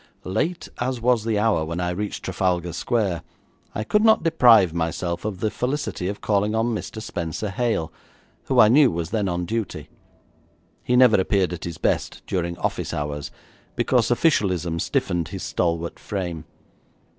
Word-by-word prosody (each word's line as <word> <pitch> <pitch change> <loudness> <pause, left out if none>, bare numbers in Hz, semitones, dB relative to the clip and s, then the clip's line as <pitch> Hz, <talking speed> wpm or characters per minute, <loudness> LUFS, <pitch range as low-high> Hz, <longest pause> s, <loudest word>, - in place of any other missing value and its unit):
Late 155 - -2
as 125 0 -1
was 120 -1 +2
the 110 -2 +1
hour 105 -6 +2
when 85 +2 -4
I 90 0 -1
reached 105 +3 -4
Trafalgar 90 -2 -1
Square, 95 -3 -1 0.5
I 105 - -1
could 210 - +2
not 220 -1 +5
deprive 115 - +5
myself 85 +2 -2
of 100 -3 -4
the 110 - 0
felicity 125 -8 -2
of 100 +1 -4
calling 105 +1 +1
on 115 +1 +1
Mr. 110 0 -5
Spenser 95 -1 -4
Hale, 110 -6 -1 0.5
who - - -1
I - - +8
knew 135 +4 +6
was 85 -1 -4
then 105 -3 0
on 90 0 -2
duty. 115 +3 -4 0.9
He 125 - +1
never 125 -6 +6
appeared 95 -2 +1
at 85 - -6
his 85 -2 -5
best - - -1
during 85 -2 -2
office - - -2
hours, 75 0 -4 0.5
because 120 -3 +2
officialism 95 - +1
stiffened 85 0 -1
his - - -6
stalwart 85 -1 -2
frame. 85 -6 -4
100 Hz, 160 wpm, -23 LUFS, 85-115 Hz, 0.9 s, I